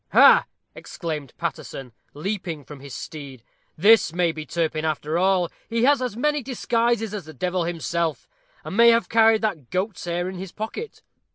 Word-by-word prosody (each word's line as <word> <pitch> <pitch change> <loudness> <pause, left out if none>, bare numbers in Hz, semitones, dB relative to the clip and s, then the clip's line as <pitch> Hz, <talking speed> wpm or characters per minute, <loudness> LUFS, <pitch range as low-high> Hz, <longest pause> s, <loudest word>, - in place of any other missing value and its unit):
"Ha!" - - +8 0.3
exclaimed 150 -7 -6
Paterson, 155 -6 -5 0.2
leaping 170 -2 -4
from 145 -2 -10
his 135 -2 -9
steed, 135 -1 -8 0.3
"this 210 +1 +5
may 175 -1 +2
be 155 -1 -8
Turpin 160 -1 -1
after 155 +1 -1
all. 185 -2 +2 0.2
He 230 0 0
has 280 0 +4
as 245 -4 -3
many 295 +3 +1
disguises 235 -3 0
as 200 -6 -5
the 155 -1 -11
devil 180 +3 -1
himself, 170 -1 -2 0.4
and - - -6
may 235 +2 +7
have 230 0 +3
carried 225 -1 +4
that 165 - -2
goat's 185 +1 -2
hair 175 +1 -2
in 185 0 -6
his 190 -1 -7
pocket." 225 - -6
180 Hz, 170 wpm, -24 LUFS, 155-225 Hz, 0.4 s, Ha